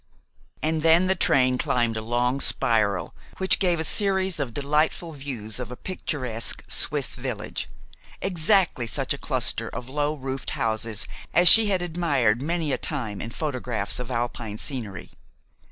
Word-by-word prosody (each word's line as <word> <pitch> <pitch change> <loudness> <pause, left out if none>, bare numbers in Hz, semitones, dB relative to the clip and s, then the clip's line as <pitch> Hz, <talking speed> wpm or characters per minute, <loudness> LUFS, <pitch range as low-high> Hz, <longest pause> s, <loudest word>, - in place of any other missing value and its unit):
And 155 0 0
then 165 +3 +5
the 190 - +3
train 130 -8 +2
climbed 120 -2 0
a 110 - -3
long 120 +4 -1
spiral 100 -7 +1 0.2
which 190 0 +5
gave 180 -4 +2
a - - -1
series 190 -2 +1
of 135 -4 -3
delightful 150 +5 0
views 130 -7 -7
of 125 -3 -5
a 125 - -7
picturesque 130 -9 -4
Swiss - - 0
village, - - -5 0.5
exactly 180 - +1
such - - -2
a - - -8
cluster - - 0
of 125 - -8
low 145 +2 -1
roofed 135 -1 -4
houses 110 -1 -1 0.3
as 175 +1 +6
she 225 +2 +11
had 190 -3 0
admired 145 -10 0
many 165 0 -1
a - - -1
time 115 -9 -2
in 115 - -5
photographs 125 -7 -3
of 125 0 -6
Alpine 120 -3 -3
scenery. 110 - -5
135 Hz, 155 wpm, -24 LUFS, 115-165 Hz, 0.5 s, she